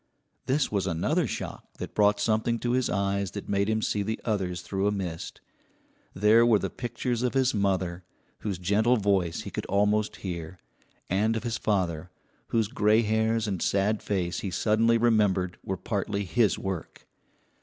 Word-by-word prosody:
This 135 +1 +1
was 100 -2 0
another 85 -3 +1
shock - - -6
that - - -6
brought 105 0 +3
something 110 +2 +1
to 120 +1 -2
his 130 0 +1
eyes 100 0 0
that 100 - -6
made 100 +1 +1
him 110 0 0
see 105 - 0
the 110 +2 -2
others 95 -5 -1
through 95 0 -1
a - - +2
mist. 90 -5 -5 0.7
There 105 +4 +5
were 120 -2 +5
the - - -3
pictures 120 0 -3
of 125 +1 -1
his 130 -1 +3
mother, 95 -3 0 0.4
whose 100 -4 -3
gentle 105 +7 +2
voice 95 -5 +1
he - - -7
could - - -4
almost 105 +2 +1
hear, 85 -1 -5 0.5
and 105 +5 +1
of 110 - -5
his 115 -2 -2
father, 90 -5 -1 0.4
whose 115 -3 +1
gray 110 -2 +3
hairs 110 0 +1
and 95 -4 -2
sad 100 +2 +1
face 90 -4 -1
he 100 - -3
suddenly 110 +5 +2
remembered 105 -6 +2
were 95 - -3
partly 100 +1 -2
his 110 +2 +2
work. 95 -4 -5
105 Hz, 170 wpm, -27 LUFS, 95-110 Hz, 0.7 s, There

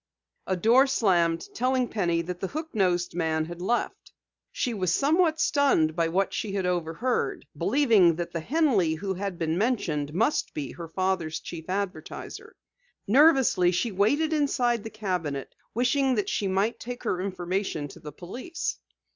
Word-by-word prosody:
A 185 - +1
door 240 +8 +5
slammed, 175 -9 +2
telling 255 +1 +1
Penny 170 -6 0
that 180 +1 -6
the 190 - -2
hook 315 - -6
nosed 180 -4 +1
man 160 -2 0
had 175 +1 -8
left. 235 +6 -2 0.4
She 245 - -2
was 185 -5 0
somewhat 320 - +2
stunned 170 - +2
by 165 -1 +1
what 190 +4 0
she 205 -3 -3
had 195 -2 -1
overheard, 175 - -1
believing 200 - +4
that 170 +1 -4
the 170 - -3
Henley 215 - +2
who 195 +4 -3
had 190 -1 -4
been 165 +1 -1
mentioned 170 - 0
must 230 +10 0
be 140 -3 -4
her 170 -1 -8
father's 180 -2 -1
chief 165 0 -9
advertiser. 200 0 -5 0.5
Nervously 260 - +5
she 200 +6 -1
waited 285 +12 +2
inside 245 -6 +1
the 225 - -6
cabinet, 180 -10 -3 0.2
wishing 255 +2 +2
that 210 - -1
she 200 - -1
might 195 +4 0
take 245 +1 -7
her 180 - -1
information 185 -4 -2
to - - -12
the 150 - -9
police. 255 - -5
190 Hz, 160 wpm, -27 LUFS, 170-245 Hz, 0.5 s, door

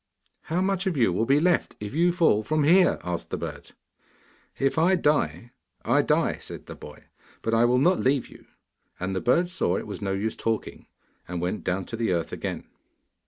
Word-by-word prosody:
'How 170 +3 -1
much 190 0 0
of 175 -5 -1
you 115 -8 +3
will 110 +5 0
be 140 +2 +4
left 175 +1 +1
if 105 -1 -6
you 170 +3 +3
fall 165 -11 +3
from 155 +7 0
here?' 180 +5 +5
asked 90 -1 -4
the - - -3
bird. - - -7 0.9
'If 135 +3 +1
I 180 +4 +4
die, 150 -7 0 0.3
I - - +4
die,' - - +1
said - - -8
the - - -8
boy, - - -12 0.4
'but 115 - -1
I 115 +1 +4
will 125 +1 +3
not 175 +8 +3
leave 135 0 +1
you.' - - -17 0.5
And 95 +1 -3
the 95 - -1
bird 170 +8 +2
saw 175 - 0
it - - -5
was 105 - -7
no 95 -1 -1
use 105 +3 -2
talking, 115 -1 -3 0.4
and 90 0 -4
went 90 +4 -3
down 95 +1 -1
to 115 - -6
the 115 -5 0
earth 85 -1 -2
again. - - -4
125 Hz, 205 wpm, -26 LUFS, 100-170 Hz, 0.9 s, here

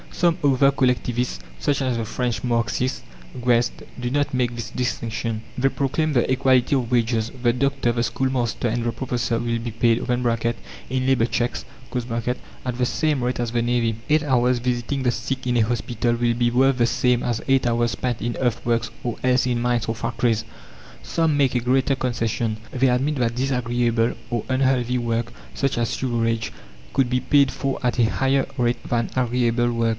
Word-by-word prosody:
Some 170 -2 +2
other 140 0 +4
collectivists, 125 -2 0 0.2
such 145 -2 0
as 130 -3 0
the 115 - -2
French 120 +2 -2
Marxist, 120 +1 0 0.4
Guesde, 120 -1 +1
do 120 0 -2
not 145 0 0
make 125 -2 +1
this 120 -1 -5
distinction. 115 -3 -2 0.2
They 135 +1 +3
proclaim 145 +3 0
the 125 -2 +2
"Equality 130 0 +3
of 125 -3 -1
Wages." 115 -2 +1
The 120 -1 +3
doctor, 135 -1 +1
the 120 0 0
schoolmaster, 120 0 -1
and 120 +1 -1
the 120 - 0
professor 120 -1 -1
will 120 -1 -1
be 115 0 -4
paid 115 +1 +2
(in 120 +1 -2
labour 130 -4 +3
cheques) 120 0 -2 0.3
at 125 +1 -4
the 125 - +2
same 150 0 0
rate 125 0 -1
as 120 -2 -1
the 120 0 +1
navvy. 120 -2 +1
Eight 155 +1 +4
hours 125 -3 +2
visiting 125 +2 -1
the 125 - +3
sick 130 +2 -3
in 120 -1 +2
a - - +4
hospital 120 +1 0
will 120 0 +1
be 120 0 +1
worth 135 +2 +3
the 120 - +3
same 125 0 +2
as 120 -2 -1
eight 135 -1 +3
hours 120 0 +1
spent 125 -3 -2
in 120 +1 -2
earthworks 115 -2 0
or 120 -2 -3
else 125 0 +3
in 120 -1 0
mines 120 -2 0
or 115 - -1
factories. 115 0 0 0.6
Some 165 -3 +1
make 135 -3 +2
a - - +3
greater 130 +3 +2
concession; 115 -3 -1
they 130 +1 +2
admit 135 +5 +1
that 120 -3 0
disagreeable 120 -3 +1 0.2
or 120 -3 -1
unhealthy 130 -2 +2
work 115 -1 -1 0.2
such 135 -3 0
as 115 - 0
sewerage 115 -3 -1 0.4
could 130 -2 +2
be 125 0 +1
paid 140 -2 +4
for 135 -1 -2
at 125 -1 0
a - - +5
higher 135 +1 +1
rate 120 -1 0
than 120 -2 -1
agreeable 120 -1 +1
work. 115 -1 +1
120 Hz, 180 wpm, -23 LUFS, 115-130 Hz, 0.6 s, a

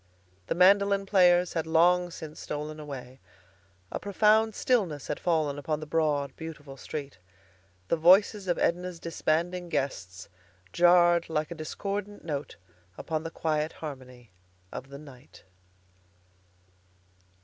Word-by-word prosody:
The - - -1
mandolin 200 +2 +4
players 180 -3 +4
had 165 -1 -2
long 175 +2 +3
since 155 -2 -9
stolen 150 +1 -5
away. 135 -3 -9 0.7
A - - -3
profound 215 +2 +2
stillness 185 - 0
had - - -4
fallen 155 -5 0
upon 150 +1 -2
the 155 - -7
broad, 150 -3 0
beautiful 150 -4 -9
street. 140 -4 -7 0.7
The 170 - +1
voices 190 +4 +4
of 175 - +1
Edna's 180 0 -1
disbanding 170 +2 -1
guests 95 - -3 0.5
jarred 175 -1 +4
like 155 -1 -2
a - - -2
discordant 200 +6 -5
note 145 -3 -4 0.4
upon 155 -1 -3
the 165 - -5
quiet 155 -1 -2
harmony 130 - -10 0.4
of 135 - -8
the 140 - -9
night. 140 -2 -15
160 Hz, 125 wpm, -28 LUFS, 150-180 Hz, 0.7 s, mandolin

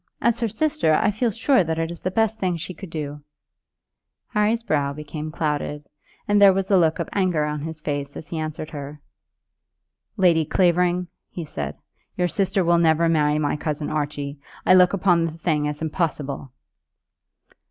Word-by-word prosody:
As 235 -1 +2
her 230 - +1
sister, 305 - +1
I 215 +5 +2
feel 230 +4 0
sure 225 +2 +3
that 160 -1 -2
it 165 0 -1
is 170 - -8
the 185 - -1
best 220 +3 0
thing 180 -3 0
she 185 +3 -6
could 190 +2 -10
do." 150 -2 -5 1.1
Harry's 220 +1 +1
brow 145 -8 0
became 150 +1 -6
clouded, 150 -1 -3 0.4
and 205 -1 +3
there 195 -1 +8
was 195 +1 -2
a 195 - +6
look 160 -2 +2
of - - -3
anger 180 -6 +1
on 150 -1 -3
his 160 +1 -6
face 145 -2 -3
as 155 - -8
he 165 - -3
answered 155 0 -5
her. 145 0 -7 1.2
"Lady 170 -4 +4
Clavering," 180 +2 +2 0.2
he 170 - -6
said, 75 - -5 0.4
"your 180 -1 +2
sister 190 0 +1
will 170 0 +3
never 165 0 +3
marry 150 -2 +2
my 150 -1 0
cousin 150 0 -3
Archie. 145 -1 -3 0.3
I - - +6
look 180 0 +6
upon 175 -3 +3
the 165 - -3
thing 155 -3 0
as 150 +1 -4
impossible." 150 -5 -2
165 Hz, 175 wpm, -23 LUFS, 150-185 Hz, 1.2 s, there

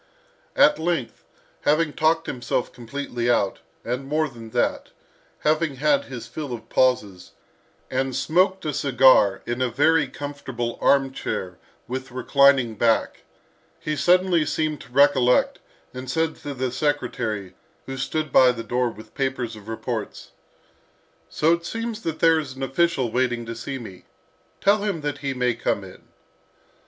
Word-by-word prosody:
At - - +5
length, 160 -6 -2 0.4
having 150 0 +2
talked 160 +1 +2
himself 120 0 -2
completely 120 0 -4
out, 100 -5 +1 0.3
and 125 +3 -3
more 155 +2 +1
than 115 -4 -11
that, 120 +2 -1 0.5
having 155 -1 +1
had 145 +1 +2
his 120 -4 -7
fill 145 0 -6
of 115 -1 -8
pauses, 105 -8 0 0.6
and 130 0 -1
smoked 185 +6 +1
a 150 - -1
cigar 130 -7 +4
in 120 +2 -3
a 130 - +1
very 150 +7 +3
comfortable 135 -5 -5
arm 135 -1 +3
chair 90 -8 -4 0.3
with 130 +2 -5
reclining 130 -1 +3
back, 115 +1 0 0.5
he 155 - -2
suddenly 180 +2 +3
seemed 155 -1 -2
to - - -15
recollect, 130 -2 +4 0.3
and 130 0 -7
said 160 +4 0
to 145 -2 -7
the 130 -1 -2
secretary, 125 -8 -2 0.3
who 135 - -6
stood 155 +3 -2
by 130 -1 +6
the 115 -2 -6
door 125 +1 0
with 110 -1 -13
papers 130 -4 -2
of 105 -1 -13
reports, 115 -1 -5 1.0
"So 160 +2 +2
it 170 0 -2
seems 230 +4 -4
that 160 -5 -3
there 165 -1 +4
is 140 -4 -6
an 135 - -6
official 135 -3 +1
waiting 120 -1 0
to 115 - -5
see 125 +4 -5
me. 95 -7 -11 0.6
Tell 205 +2 +4
him 200 -6 -2
that 145 -1 -3
he 140 -2 -3
may 125 -1 +1
come 115 - -1
in." - - -13
135 Hz, 150 wpm, -23 LUFS, 120-155 Hz, 1.0 s, by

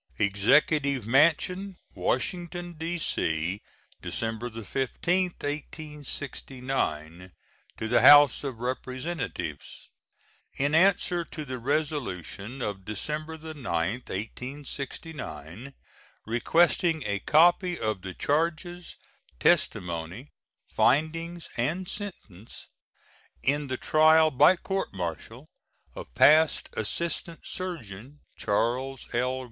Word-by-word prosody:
EXECUTIVE 130 +6 +3
MANSION, 175 - +2 0.2
Washington, 175 -1 -2
D.C., 105 - -2 0.4
December 115 +1 -3
15, 135 - -1
1869. 135 - -5 0.5
To 110 - -3
the 120 - +3
House 145 -2 +8
of 135 -4 -4
Representatives: 130 - -5 0.7
In 145 +2 +1
answer 175 0 +3
to 155 -1 -7
the 130 -2 -5
resolution 125 - -3
of 100 -2 -4
December 155 +10 -4
9, 160 0 -8
1869, 125 - -5 0.5
requesting 160 +6 +2
a 100 -1 -1
copy 175 - +4
of 110 -4 -2
the 95 -1 -7
charges, 170 +3 -1 0.4
testimony, 95 - 0 0.4
findings, 165 +5 +1
and 170 +10 -1
sentence 115 - -8 0.7
in 145 +1 +1
the 130 -1 -3
trial 155 +2 +5
by 150 +7 +6
court 195 +2 -3
martial 85 -4 -5 0.5
of - - -9
Passed 155 +1 +5
Assistant 165 +8 -3
Surgeon 145 - -7
Charles 120 +5 -1
L. 125 +2 0
140 Hz, 85 wpm, -27 LUFS, 110-160 Hz, 0.7 s, House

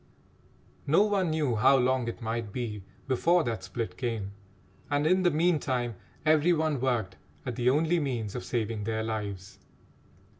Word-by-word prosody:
No 160 +8 +5
one 200 -4 +1
knew 150 -6 0
how 135 +6 +5
long 130 -1 +1
it 115 +1 -5
might 115 -1 -3
be 110 -3 -4 0.3
before 165 +6 +3
that 115 -7 -3
split 110 +5 -5
came, 115 -6 -3 0.6
and 145 0 +1
in 185 +4 +4
the 180 - +4
meantime 150 -7 +1 0.3
every 155 +2 +4
one 155 -4 0
worked 115 -8 -1 0.3
at 125 -3 -3
the 120 +1 +2
only 160 +5 +2
means 120 -8 -2
of 125 - -5
saving 110 -3 -2
their 110 0 -1
lives. 105 -4 -5
125 Hz, 155 wpm, -28 LUFS, 110-155 Hz, 0.6 s, No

